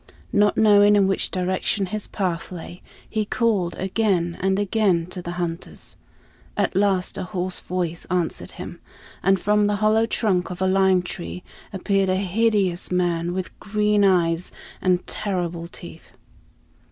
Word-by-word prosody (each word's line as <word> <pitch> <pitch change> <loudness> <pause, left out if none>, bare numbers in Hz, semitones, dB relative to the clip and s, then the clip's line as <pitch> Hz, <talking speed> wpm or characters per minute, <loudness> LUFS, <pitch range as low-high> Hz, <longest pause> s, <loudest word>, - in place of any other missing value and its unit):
Not 205 0 +3
knowing 205 -1 +6
in 200 -1 +4
which 195 0 +1
direction 185 +2 -1
his 210 +3 -4
path 180 -4 -3
lay, 175 0 -8 0.3
he 215 -1 -1
called 210 -5 0
again 190 -3 0
and 190 +1 +2
again 200 -4 +2
to 180 - -6
the 175 0 -5
hunters. 175 -1 -5 0.6
At - - 0
last 195 -2 +1
a - - -2
hoarse 185 -1 -2
voice 175 -2 -3
answered 175 -2 -2
him, - - -8 0.4
and 195 0 +3
from 210 +1 +2
the 205 - +1
hollow 215 +2 +3
trunk 190 -6 0
of 180 - -6
a 190 - +1
lime 190 -1 +3
tree 85 - -6 0.3
appeared 195 -1 +1
a 185 - +2
hideous 195 -2 +1
man 175 -1 0
with 185 0 -5
green 210 0 +1
eyes 175 -2 +2 0.3
and 180 -1 +1
terrible 175 -4 -3
teeth. 170 -1 -11
185 Hz, 150 wpm, -23 LUFS, 175-205 Hz, 0.6 s, knowing